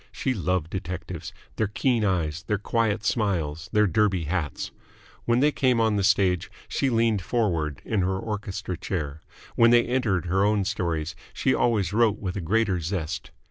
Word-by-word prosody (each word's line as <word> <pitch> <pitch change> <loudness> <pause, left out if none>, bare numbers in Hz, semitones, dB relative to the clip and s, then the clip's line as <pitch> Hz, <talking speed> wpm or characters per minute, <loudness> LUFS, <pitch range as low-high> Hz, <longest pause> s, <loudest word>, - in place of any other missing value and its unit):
She 130 - -1
loved 90 -5 -1
detectives 85 -2 -5 0.3
their 110 - +1
keen 115 +2 +1
eyes, 85 -5 0
their 105 - +1
quiet 110 0 0
smiles, 90 -8 -1
their 105 0 +4
Derby 95 -1 +2
hats. 80 -1 -3 0.5
When 120 +1 +3
they 150 +1 +4
came 130 -4 +2
on 110 -2 +3
the 100 - +1
stage, 95 -3 +2 0.2
she 135 - 0
leaned 115 -4 +2
forward 85 - -1
in 105 -3 0
her 95 +1 0
orchestra 100 -3 -4
chair; 80 -5 -4 0.3
when 115 0 +6
they 120 0 +5
entered 115 -9 0
her 95 +3 +2
own 105 -1 +2
stories, 85 -6 -2 0.2
she - - +2
always 105 -6 +1
wrote 110 -1 +3
with 95 -3 -4
a 100 - -2
greater 100 +2 +1
zest. 80 -1 -3
100 Hz, 170 wpm, -26 LUFS, 85-110 Hz, 0.5 s, when